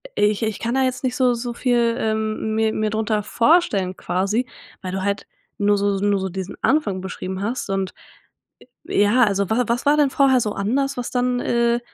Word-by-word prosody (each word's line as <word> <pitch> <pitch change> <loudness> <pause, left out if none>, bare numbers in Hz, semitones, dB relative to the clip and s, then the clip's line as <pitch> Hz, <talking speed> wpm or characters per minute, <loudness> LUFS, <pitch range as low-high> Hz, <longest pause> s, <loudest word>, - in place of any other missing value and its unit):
ich 210 +1 +2
ich 220 -2 -2
kann 235 +1 -2
da 265 0 +2
jetzt 255 0 -2
nicht 255 -1 -1
so 255 -2 +3
so 240 0 -4
viel, 235 -2 +1
ähm, 220 0 -1
mir 220 0 +1
mir 215 0 0
drunter 215 0 0
vorstellen 210 - +2
quasi, 200 +9 -1 0.3
weil 185 - -5
du 190 0 -2
halt 200 0 -2 0.3
nur 205 0 +3
so 200 -1 0
nur 205 -1 +2
so 190 0 -3
diesen 190 +1 -6
Anfang 235 -11 +1
beschrieben 190 0 -5
hast 235 0 -3
und 195 -1 -1 1.0
äh, - - +1
ja, 235 +5 +4
also 200 -2 0
wa 235 +2 +1
was 235 +2 -1
war 290 +1 +4
denn 290 -2 +4
vorher 265 -2 +4
so 210 -2 -2
anders, 275 +7 -1
was 245 - -4
dann, 250 0 0
äh, 235 0 +1
220 Hz, 200 wpm, -21 LUFS, 200-250 Hz, 1.0 s, ja